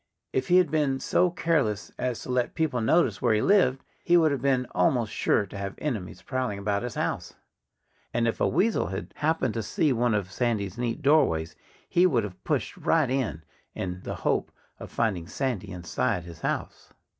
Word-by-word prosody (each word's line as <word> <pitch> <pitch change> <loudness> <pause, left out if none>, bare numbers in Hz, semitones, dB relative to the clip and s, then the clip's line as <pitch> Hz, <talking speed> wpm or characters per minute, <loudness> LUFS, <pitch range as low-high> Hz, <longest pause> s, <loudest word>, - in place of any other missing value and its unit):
If 130 - 0
he 180 0 +5
had 180 -5 +3
been 145 -4 +1
so 180 +5 +2
careless 155 - 0
as 125 -2 -2
to - - -9
let 125 -1 0
people 150 -7 0
notice 110 - +2
where 120 -3 +3
he 105 - +1
lived 180 -10 +3 0.2
he 175 - +5
would 160 -3 +4
have 140 -3 -2
been 130 -2 +2
almost 110 +5 +1
sure 105 - +2
to 100 - -12
have 100 0 -4
enemies 110 -12 -4
prowling 130 -6 -2
about 100 0 -1
his 120 -2 -5
house. - - -3 0.8
And 115 0 +1
if 115 - -2
a - - +4
weasel 195 - +1
had 95 -1 -6
happened 150 -6 +1
to 115 - -2
see 140 +6 +1
one 120 -2 +1
of 95 -2 -2
Sandy's 110 -5 -1
neat 120 +4 -2
doorways 80 - +3 0.3
he 180 +1 +4
would 125 -10 +1
have 95 -3 -8
pushed - - -1
right 155 -6 +2
in, 125 -12 -1 0.3
in 90 0 -4
the - - -5
hope - - -1 0.3
of - - -8
finding 95 -8 -1
Sandy 125 -3 -3
inside 85 -2 -1
his 85 -2 -11
house. - - -4
120 Hz, 190 wpm, -27 LUFS, 100-145 Hz, 0.8 s, he